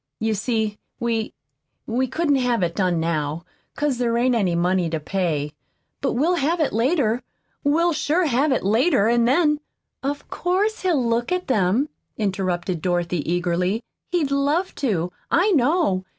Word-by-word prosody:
You 220 0 0
see, 215 0 -1 0.2
we 230 -2 -1 0.5
we 255 +3 0
couldn't 290 +2 +1
have 245 -6 +1
it 170 -1 -1
done 180 -4 +1
now, 160 0 -2 0.3
'cause 290 -4 -1
there 235 -1 +1
ain't 250 +1 +2
any 195 -7 +1
money 175 0 +1
to 160 -1 -2
pay. 155 -3 -2 0.5
But 270 - 0
we'll 325 +8 +2
have 330 +4 +1
it 310 - +1
later. 240 0 +1 0.4
We'll 330 +4 +3
sure 310 +4 +1
have 280 +1 +2
it 260 - +1
later, 220 - +3
an' 235 0 +3
then 300 +3 +3 0.2
" - - -57
"Of 285 - -9
course 395 +5 0
he'll 330 -9 +1
look 235 +3 0
at 365 0 0
them," 220 +2 +2 0.3
interrupted 185 -4 -1
Dorothy 175 -2 -1
eagerly. 180 +5 0 0.3
"He'll 285 -6 +1
love 320 +7 0
to, 180 - 0 0.2
I 375 +5 +3
know. 285 - +2
235 Hz, 160 wpm, -23 LUFS, 185-295 Hz, 0.5 s, We'll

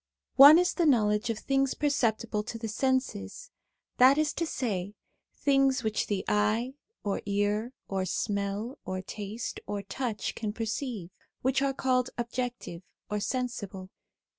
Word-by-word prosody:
One 285 +4 +11
is 360 +1 +2
the 340 -3 +2
knowledge 210 -4 +3
of 225 - -1
things 270 +2 0
perceptible 230 -7 0
to 230 - -5
the 225 0 -5
senses 255 - -2 0.5
that 260 +3 +7
is 305 -1 +1
to 335 - -2
say, 205 -8 -3 0.4
things 270 -2 +2
which 220 -1 -1
the 200 -2 -2
eye, 215 +5 +1 0.3
or 200 -2 -1
ear, 205 +4 0
or 190 -1 -1
smell, 200 +5 -2
or 185 0 -4
taste, 210 +4 -5
or 205 -1 -3
touch 220 +1 -3
can 215 -2 -4
perceive, 225 -4 -4 0.3
which 265 +1 +2
are 275 -1 0
called 255 -1 +1
objective 240 -7 -4 0.3
or 210 - 0
sensible. 205 -6 -4
230 Hz, 140 wpm, -29 LUFS, 205-260 Hz, 0.5 s, One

